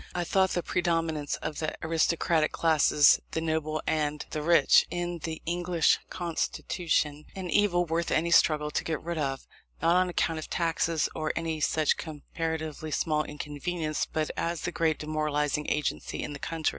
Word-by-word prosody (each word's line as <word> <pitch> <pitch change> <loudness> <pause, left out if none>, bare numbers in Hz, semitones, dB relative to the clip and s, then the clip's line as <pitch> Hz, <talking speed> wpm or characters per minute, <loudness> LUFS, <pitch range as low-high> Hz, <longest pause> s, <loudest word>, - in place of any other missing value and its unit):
I 175 - 0
thought 190 +2 +2
the 175 - -1
predominance 165 -4 0
of 155 -2 -4
the 155 - -2
aristocratic 165 0 +2
classes, 150 -2 +4
the - - 0
noble 155 -1 -1
and 150 -1 -1
the 155 - -2
rich, 170 +2 +5
in 175 -1 -3
the 160 0 -5
English 175 -1 +2
constitution, 160 -3 -1
an 185 -3 -5
evil 175 -3 +3
worth 165 +1 -1
any 170 +2 +1
struggle 150 -3 +4
to - - -1
get 160 -2 -2
rid 170 0 -4
of; 135 -2 -2 0.3
not 165 +1 +3
on 185 0 +2
account 165 -2 0
of 155 - -8
taxes, 165 -2 0
or 155 -1 -1
any 165 -1 -2
such 155 0 +2
comparatively 160 0 -4
small 155 0 0
inconvenience, 155 +2 -3
but 155 -1 -2
as 170 0 -2
the 175 - -2
great 160 -3 +1
demoralizing 150 -1 -1
agency 150 -1 -2
in 150 - -5
the 145 - -8
country. 165 +1 -1
160 Hz, 165 wpm, -28 LUFS, 155-170 Hz, 0.3 s, rich